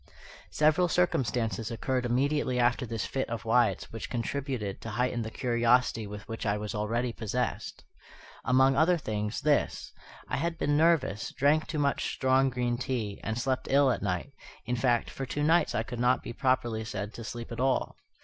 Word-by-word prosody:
Several 155 +4 +3
circumstances 115 - 0
occurred 125 +2 -1
immediately 130 +1 +1
after 125 +1 +2
this 115 -2 -3
fit 135 - -2
of 115 0 -5
Wyatt's 120 +1 +2
which 115 - -6
contributed 120 -4 -3
to 115 - -6
heighten 120 +2 -1
the 110 - -4
curiosity 120 -2 +1
with 105 +1 -9
which 115 - -5
I 105 -1 +1
was 105 +1 -5
already 115 +3 -1
possessed. 110 -3 -3 0.6
Among 130 +2 +4
other 165 +5 +4
things, 105 -5 -3
this: 150 0 0 0.3
I - - -2
had 165 +3 -2
been 145 -2 +1
nervous; 150 - +2
drank 150 +3 +2
too 155 - -4
much 140 -1 0
strong 130 +1 +3
green 120 -1 -1
tea, 115 -6 -3
and 110 +1 -2
slept 130 +1 -1
ill 140 -1 +5
at - - -2
night, 95 +7 -2 0.3
in 125 - -1
fact, 120 -1 +1
for 135 - -5
two 145 +4 -2
nights 160 +1 +3
I 110 - +1
could 120 +1 -7
not 125 +1 +2
be - - -6
properly 125 -4 0
said 105 -1 -5
to 115 - -8
sleep 115 +2 -7
at 115 - -6
all. 130 0 +1
125 Hz, 180 wpm, -29 LUFS, 115-135 Hz, 0.6 s, ill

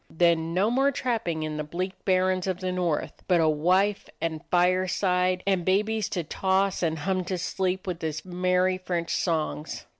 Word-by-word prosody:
Then 165 0 +2
no 200 +5 +2
more 270 +3 +3
trap 245 -4 -2
ping 160 -2 -2
on 155 -1 -4
the 150 - -2
bleak 180 +5 -3
barrens 185 -1 +2
of 185 -1 -1
the 185 -1 -2
North, 175 -4 -2
but 180 -2 +4
a 160 - +4
wife 185 +7 +2
and 160 -2 -2
fireside, 180 0 +2
and 190 -3 +1
babies 210 +3 +1
to 175 - -2
toss 190 +4 0
and 160 -2 0
hum 185 +4 -1
to 185 +1 -2
sleep 185 +1 -2
with 180 -3 -4
his 155 0 -3
merry 180 +1 +1
French 175 -2 -2
songs. 160 -2 -2
180 Hz, 180 wpm, -26 LUFS, 170-190 Hz, -, but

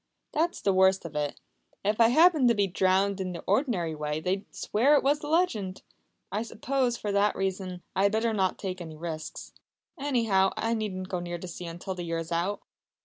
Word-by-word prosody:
"That's 335 +3 0
the 195 - +2
worst 190 0 +4
of 160 -2 -7
it! 145 -1 -2 0.5
If 210 +3 +2
I 225 - +8
happened 310 +1 +5
to 235 - +4
be 205 -1 +3
drowned 190 +1 +1
in 185 -1 -3
the 170 - -7
ordinary 195 - +1
way 150 0 -3
they'd 185 +5 -1
swear 265 +8 +2
it - - +3
was 285 +2 +3
the 295 - -7
legend. 265 - 0 0.5
I 210 - -1
suppose, 245 +2 -1
for 210 - -3
that 200 +1 +2
reason, 190 -2 -3
I 190 - +2
had 200 0 +4
better 225 +1 +1
not 190 -3 +1
take 185 -2 -5
any 160 -2 -8
risks. 160 -1 -6 0.5
Anyhow, 225 -9 +2
I 225 +1 0
needn't 190 -4 -3
go 180 - -2
near 175 0 -4
the 185 - -8
sea 175 0 -7
until 175 +3 -5
the 180 - -6
year 165 -1 -2
is 165 0 -5
out!" 175 +5 -1
195 Hz, 205 wpm, -28 LUFS, 175-230 Hz, 0.5 s, I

